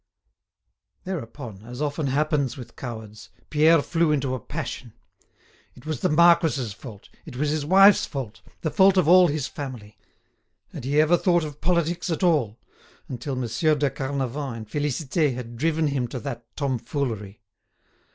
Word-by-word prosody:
Thereupon, 125 - -6
as 120 +2 -9
often 145 0 -1
happens 140 -1 0
with 125 - -10
cowards, 110 -5 -8 0.2
Pierre 155 0 +5
flew 165 -2 +1
into 135 -3 0
a 130 - -3
passion. 130 -3 -6 0.8
It - - -16
was 155 -4 -3
the - - +1
marquis's 160 - +4
fault, 105 -1 -12
it - - -11
was 145 +3 0
his 150 -1 -2
wife's 195 +3 +6
fault, 120 -7 -6 0.2
the 155 - -2
fault 190 0 +5
of 180 - +3
all 180 +1 +7
his 145 -3 -2
family. 125 -9 -8 0.7
Had - - -7
he 145 +3 +2
ever 155 +3 +4
thought 175 -1 +2
of 150 -1 -8
politics 170 +1 0
at 165 +2 -2
all, 140 - +2 0.5
until 130 +2 -5
Monsieur 130 +6 +1
de 145 -2 0
Carnavant 135 -1 -3
and 110 -1 -8
Félicité 145 - -1
had 120 -1 -7
driven 160 +5 0
him 135 -3 -1
to 125 +2 -6
that 120 -3 -7
tomfoolery? 120 -7 -3
140 Hz, 155 wpm, -24 LUFS, 120-155 Hz, 0.8 s, all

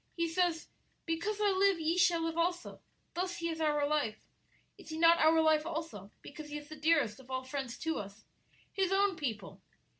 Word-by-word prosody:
He 335 -1 0
says, 335 -1 0 0.4
'Because 340 +6 -2
I 415 -1 +3
live, 385 -1 +3
ye 320 +1 0
shall 355 -2 +3
live 325 0 -2
also;' 345 +1 -2 0.3
thus 360 0 -3
He 335 0 -2
is 320 0 -4
our 295 -2 +2
life. 290 -8 -1 0.5
Is - - -14
He 315 - -5
not 335 +1 +6
our 320 +1 +5
life 315 -1 +3
also 320 - -6
because 300 +1 -9
He 295 - -4
is 295 0 -11
the 310 - -8
dearest 295 -8 +1
of 260 -1 -16
all 260 0 -3
friends 260 -2 -5
to 320 0 -2
us 200 +2 -9 0.5
His 385 -1 0
own 390 -1 +3
people?" 225 -10 -5
320 Hz, 200 wpm, -32 LUFS, 290-345 Hz, 0.5 s, not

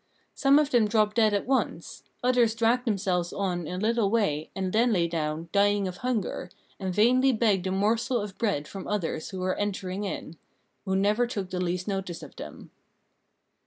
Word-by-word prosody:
Some 275 0 +4
of 300 -1 +2
them 235 -4 +4
dropped 215 0 +1
dead 220 -2 +5
at 205 -1 0
once; 240 -10 -1 0.2
others 245 -3 +3
dragged 235 +2 +2
themselves 185 -5 0
on 180 -4 -2
a 180 - -4
little 220 +1 +1
way 195 -9 0
and 190 -2 -2
then 235 +2 +3
lay 175 -5 +2
down, 160 0 -3
dying 205 0 +3
of 180 -1 -6
hunger, 225 -6 -2 0.3
and 190 -2 -2
vainly 250 +7 +4
begged 210 -6 +1
a - - -1
morsel 225 +6 +1
of 205 -2 -5
bread 175 -10 0
from 195 +2 -8
others 170 -6 -2
who 190 -1 -6
were 185 0 0
entering 200 -1 -3
in 170 -4 -5 0.5
who 190 -1 0
never 210 +5 +2
took 200 -6 -4
the 180 - -2
least 180 +1 -2
notice 190 -4 -4
of - - -12
them. - - -10
200 Hz, 185 wpm, -27 LUFS, 185-230 Hz, 0.5 s, dead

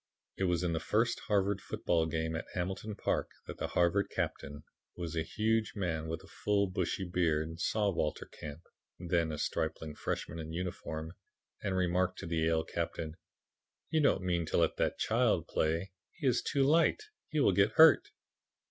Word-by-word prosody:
It 95 - 0
was 90 -1 +1
in 85 -2 +1
the 80 - 0
first 115 +7 +1
Harvard 100 -1 +1
football 80 -2 0
game 80 0 -2
at 80 - -4
Hamilton 95 +4 -3
Park - - -1 0.2
that - - -8
the - - -1
Harvard 90 +3 +2
captain, 75 +2 -4 0.3
who 90 - -6
was 85 -1 -4
a 80 - +1
huge 110 +5 0
man 80 -5 -2
with 80 0 -4
a - - -14 0.2
full, 100 -1 +3
bushy 95 0 -2
beard, 80 -2 0
saw 105 +1 +1
Walter 75 -4 -2
Camp, 75 +2 -9 0.3
then 85 -2 0
a 75 - -4
stripling 80 0 -2
freshman 80 +2 -4
in 80 0 -6
uniform, 85 -2 -4 0.5
and 95 -1 -1
remarked 90 0 +1
to - - -6
the 85 0 -2
Yale 80 0 +2
Captain: 80 -2 -3 0.8
"'You 160 - +3
don't 140 - +3
mean 85 -3 0
to - - 0
let - - +2
that - - 0
child - - +2
play; 80 +4 0 0.2
he 165 - -7
is 125 -2 +3
too 140 - +1
light; 165 - +4 0.3
he - - 0
will - - +4
get - - +3
hurt.' - - +7
85 Hz, 180 wpm, -32 LUFS, 80-100 Hz, 0.8 s, hurt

